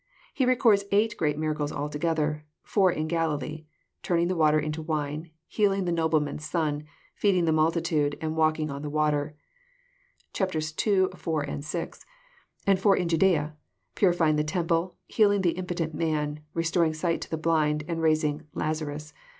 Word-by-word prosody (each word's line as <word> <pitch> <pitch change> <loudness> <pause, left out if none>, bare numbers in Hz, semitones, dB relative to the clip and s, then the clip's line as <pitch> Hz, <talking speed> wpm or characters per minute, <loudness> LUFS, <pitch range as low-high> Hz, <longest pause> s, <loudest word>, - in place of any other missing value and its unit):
He 260 -3 +1
records 230 -5 +4
eight 210 +2 +2
great 150 -3 0
miracles 155 -1 -1
altogether: 150 +1 -1 0.2
four 190 -3 +3
in 155 -1 -2
Galilee,— 155 -2 -2 0.4
turning 170 0 +1
the 185 - 0
water 155 -2 +4
into 155 +1 -3
wine, 155 0 -3 0.2
healing 195 -3 +1
the 175 - 0
nobleman's 160 -3 0
son, 150 -2 -1 0.3
feeding 185 -4 +2
the 160 - +2
multitude, 155 -2 +1
and 155 0 -3
walking 155 -1 +1
on 140 0 -5
the 150 - -4
water, 150 0 0 1.0
(chap, 190 -3 -1
ii., - - +1
iv., 185 +5 0 0.2
and 145 - -5
vi. 165 +3 -3 0.4
;) - - -34
and 195 -1 +3
four 195 0 +4
in 175 -2 0
Jadsea, 165 -3 +2 0.2
— 95 0 -50
purifying 170 -5 +3
the 150 - +2
temple, 170 +2 -1
healing 205 -2 +3
the 175 -3 +3
impotent 175 -2 -3
man, 150 -2 -1 0.2
re 165 - 0
storing 165 -1 +1
sight 165 +1 -1
to - - -6
the 160 - -2
blind, 155 -2 +1
and 165 -2 -2
raising 155 -2 +1
Lazarus. 150 -1 -3
160 Hz, 165 wpm, -27 LUFS, 150-175 Hz, 1.0 s, records